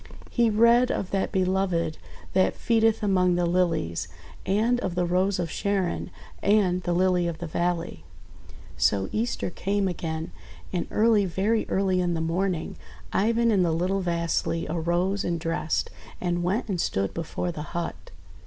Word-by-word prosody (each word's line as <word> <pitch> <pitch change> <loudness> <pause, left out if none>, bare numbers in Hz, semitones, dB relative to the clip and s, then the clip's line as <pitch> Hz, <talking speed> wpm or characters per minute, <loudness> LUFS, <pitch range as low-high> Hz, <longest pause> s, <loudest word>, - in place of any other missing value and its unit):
He 235 -2 +3
read 235 +3 +5
of 190 - -2
that 195 -1 0
Be 190 -2 +2
loved 185 -4 0 0.3
that 185 0 +3
feedeth 225 -1 +2
among 185 -3 +3
the 175 0 +1
Lilies, 170 - 0 0.4
and 225 +5 +2
of 190 -7 -3
the 180 0 +1
Rose 185 +3 +1
of 170 -3 -2
Sharon 195 -3 -1 0.3
and 195 -3 +3
the 175 - -1
Lily 180 -1 +2
of 170 -2 -3
the 175 - -5
Valley. 170 - -2 0.4
• - - -16
•««••••• - - -18 0.2
So 95 -1 +2
Easter 220 -4 -1
came 200 +2 0
again. 160 -2 -4 0.4
And 180 - -1
early, 215 -2 +3
very 200 +5 0
early 190 -1 +1
in 175 -1 0
the - - -1
morning, 170 +1 -1 0.4
Ivan 230 +3 +2
and 195 -4 +3
the 170 - +2
little 180 +4 0
Vasily 170 -1 -1
arose 175 +4 0
and 170 -1 -1
dressed, 165 -1 -1 0.3
and 175 -1 -1
went 190 +8 0
and 185 -5 -1
stood 95 0 -1
before 170 +2 -3
the 155 - -6 0.2
hut. 85 - -5
180 Hz, 165 wpm, -26 LUFS, 170-200 Hz, 0.4 s, read